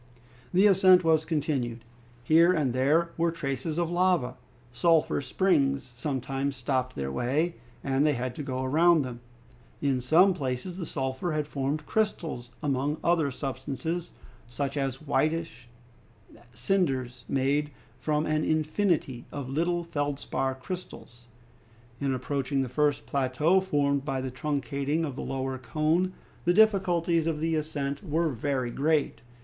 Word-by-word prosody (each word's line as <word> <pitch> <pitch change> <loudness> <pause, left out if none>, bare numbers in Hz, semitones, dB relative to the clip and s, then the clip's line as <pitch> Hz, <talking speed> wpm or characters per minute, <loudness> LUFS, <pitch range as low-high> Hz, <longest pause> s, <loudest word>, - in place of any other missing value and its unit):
The 185 +3 +4
ascent 185 -2 +6
was 160 -1 +3
continued. 135 -8 -1 0.4
Here 165 +6 +5
and 150 -8 +1
there 150 +7 +2
were 170 0 +2
traces 150 0 -3
of 170 -1 0
lava. 175 -8 +2 0.4
Sulphur 160 +3 +2
springs 140 -4 +1
sometimes 135 +1 -2
stopped 130 0 -1
their 70 -1 -3
way, 145 - 0 0.3
and 135 +1 +1
they 150 -1 +3
had 125 -1 -3
to - - -3
go 130 -2 -3
round 160 +2 +4
them. 120 -2 -7 0.6
In 135 -3 0
some 175 +9 +5
places 140 +3 -4
the 170 - -4
sulphur 135 +4 -2
had 150 -1 0
formed 145 +1 -2
crystals 160 - -1
among 145 +1 0
other 170 -4 +2
substances, 140 +6 -4 0.4
such 135 +3 -3
as 135 -1 -2
whitish 155 -4 -1 0.8
cinders 130 - -1
made 140 +2 +1 0.4
of 150 0 +2
an 155 0 0
infinity 155 -5 0
of 140 -3 -5
little 170 +5 0
feldspar 145 -4 -2
crystals. 130 -6 -8 0.7
In 140 -1 0
approaching 135 +1 -1
the 130 - -5
first 145 +2 +1
plateau 140 +7 +2
formed 140 -6 +1
by 135 -2 -2
the 130 0 -4
truncating 145 +3 -1
of 140 -4 -5
the - - -5
lower 130 -1 -3
cone, 155 +9 0 0.3
the 175 0 +2
difficulties 180 -6 +3
of 160 -2 -1
the 165 +1 0
ascent 145 -2 -3
were 165 -1 0
very 130 -1 -2
great. 150 +3 0
145 Hz, 140 wpm, -28 LUFS, 130-165 Hz, 0.8 s, ascent